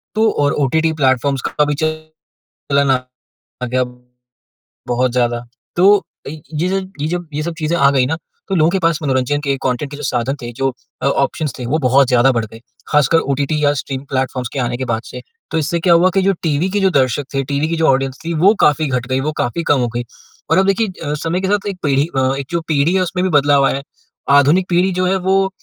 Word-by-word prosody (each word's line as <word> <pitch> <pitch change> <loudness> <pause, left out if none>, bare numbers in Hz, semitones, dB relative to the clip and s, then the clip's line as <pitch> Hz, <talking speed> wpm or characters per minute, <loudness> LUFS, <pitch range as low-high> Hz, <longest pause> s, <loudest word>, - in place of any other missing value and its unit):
तो 220 0 +3
और 145 0 +1
OTT 160 +4 +1
platforms 130 +1 +2
का 150 - +1
भी 145 - -1
चलन 155 0 -5 0.6
आ 125 -1 -3 0.4
गया 125 +1 0 1.0
बहुत 125 0 +1
ज़्यादा। 120 -1 0 0.3
तो 195 +4 +6 0.3
अ - - -4
,यज 155 +4 -4 0.3
ये 150 - 0
जब 175 +1 -3
ये 150 - -2
सब 170 0 -3
चीज़ें 160 +2 0
आ 140 -3 +5
गई 130 -2 +2
ना, 160 +5 -1 0.3
तो 195 - 0
लोगों 160 -1 +4
के 190 - 0
पास 165 -3 +1
मनोरंजन 135 +1 0
के 140 -1 0
कॉन्टेंट 130 +2 -1
के 145 - -7
जो 150 - -8
साधन 125 +2 -1
थे, 120 - -6
जो 135 +2 0 0.3
अ, - - +2
ऑप्शंस 140 +1 0
थे, 125 - -4
वो 145 +6 0
बहुत 135 0 +4
ज़्यादा 125 +1 +4
बढ़ 115 -2 -1
गए। 110 +1 -13 0.3
ख़ासकर 150 +2 +3
ओटीटी 140 +2 -1
या 145 - +3
स्ट्रीम 135 -1 -4
प्लेटफ़ॉर्म्स 130 -2 -2
के 140 - -3
आने 120 -1 -1
के 130 - -3
बाद 110 - -1
से। - - -8 0.3
तो - - 0
इससे 165 +3 -1
क्या 170 0 +4
हुआ 175 +2 +5
कि 195 - +4
जो 195 - +3
टीवी 160 +3 0
के 205 - 0
जो 195 - +3
दर्शक 135 -1 +1
थे, 135 - +1
टीवी 140 +3 -1
की 165 - -1
जो 160 - +2
ऑडियंस 135 0 +1
थी, 170 - -2
वो 185 +7 +4
काफ़ी 150 +1 +3
घट 125 -2 -2
गयी, 130 +1 0
वो 155 +3 -1
काफ़ी 145 +8 -2
कम 140 - +3
हो 120 - +1
गयी। 120 - -1 0.5
और 165 - +4
अब 190 - +2
देखिए 210 +3 +2 0.2
अ, - - 0
समय 175 +3 -1
के 190 - -1
साथ 205 0 0
एक 195 - -6
पीढ़ी 140 -1 +2
अ 130 0 +2
एक 140 - -5
जो 170 -1 0
पीढ़ी 155 +3 +2
है 190 - +3
उसमें 180 0 -1
भी 185 - +1
बदलाव 140 -1 +3
आया - - +1
है। 140 - -7 0.5
आधुनिक 160 +7 +3
पीढ़ी 180 +2 +2
जो 185 0 0
है 190 +1 +2
वो 195 0 +3
145 Hz, 235 wpm, -17 LUFS, 130-170 Hz, 1.0 s, तो